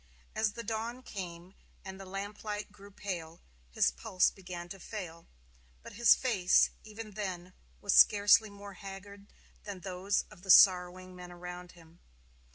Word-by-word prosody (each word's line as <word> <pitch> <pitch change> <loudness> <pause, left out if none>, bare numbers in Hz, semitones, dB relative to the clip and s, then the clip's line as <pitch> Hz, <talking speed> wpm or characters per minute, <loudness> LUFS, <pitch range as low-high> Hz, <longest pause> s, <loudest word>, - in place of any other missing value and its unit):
As 220 -2 0
the 235 - -7
dawn 230 +3 -4
came 180 -4 -8 0.3
and 190 0 -8
the 195 - -9
lamplight 205 +2 -5
grew 200 0 -15
pale, 175 -5 -6 0.3
his - - +2
pulse 65 - +1
began 175 -2 -8
to 195 - -9
fail; 175 -5 -8 0.6
but - - -11
his 235 +2 +6
face, 205 -9 +3
even 215 0 -9
then, 185 -3 -5 0.3
was 200 - +1
scarcely 205 +1 +6
more 200 0 -11
haggard 200 +1 -10 0.4
than 200 -3 -7
those 190 +2 -1
of - - -15
the 190 - -13
sorrowing 185 0 +5
men 180 0 -10
around 180 0 -9
him. 165 -1 -19
195 Hz, 150 wpm, -31 LUFS, 180-205 Hz, 0.6 s, his